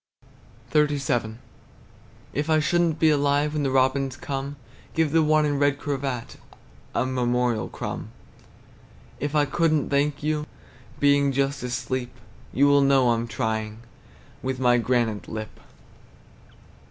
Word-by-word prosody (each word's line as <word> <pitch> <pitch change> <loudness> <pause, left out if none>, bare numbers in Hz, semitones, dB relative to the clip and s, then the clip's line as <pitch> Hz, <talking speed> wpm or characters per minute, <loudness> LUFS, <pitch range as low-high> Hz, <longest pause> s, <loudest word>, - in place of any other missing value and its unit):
XXXVII. 140 -7 +1 1.0
If 150 +3 -2
I 155 -1 +4
should 175 +3 +2
n't 165 -2 +1
be 160 -1 +4
alive 145 0 +2
When 150 - -1
the 140 - 0
robins 130 0 +1
come, 140 0 -4 0.4
Give 160 -2 +2
the 165 +1 +4
one 155 0 +3
in 145 -1 0
red 145 -1 +2
cravat 135 -4 -4 0.6
A - - +1
memorial 125 -2 0
crumb. - - -6 1.1
If 145 +2 -3
I 150 -1 +4
could 165 +3 +1
n't 150 -3 0
thank 145 0 +1
you, 150 0 -1 0.5
Being 140 -1 +4
just 135 +1 0
asleep, 125 0 -3 0.4
You 140 - +3
will 145 0 +5
know 135 -3 +4
I'm 115 0 -1
trying 110 0 -3 0.6
With 130 0 -3
my 125 -1 +4
granite 115 -3 0
lip! 110 -1 -7
140 Hz, 135 wpm, -25 LUFS, 125-145 Hz, 1.1 s, will